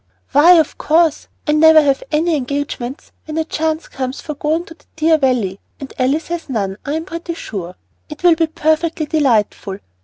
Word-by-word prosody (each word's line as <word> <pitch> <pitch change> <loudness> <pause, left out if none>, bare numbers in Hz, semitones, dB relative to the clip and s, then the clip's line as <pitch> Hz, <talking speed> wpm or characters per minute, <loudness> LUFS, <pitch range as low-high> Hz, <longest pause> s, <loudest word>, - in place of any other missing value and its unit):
"Why, 300 +6 +7
of 320 -4 +2
course. 320 0 +2 0.2
I 300 - +1
never 315 +1 +7
have 280 -3 +2
any 320 +2 +1
engagements 275 -1 -4
when 310 0 -5
a 320 - +1
chance 315 0 -2
comes 260 0 -5
for 305 - -6
going 310 +4 -1
to 330 - -12
the 330 - -29
dear 320 0 +3
Valley; 235 -8 0 0.2
and 275 - -8
Alice 275 +6 0
has 340 -3 -4
none, 200 -6 -2
I 285 - -3
am 320 +1 -3
pretty 335 -1 -6
sure. 185 - -6 0.3
It 300 +2 -10
will 350 -1 +7
be 325 0 +1
perfectly 315 +1 0
delightful! 230 -10 0
305 Hz, 185 wpm, -17 LUFS, 265-320 Hz, 0.3 s, Why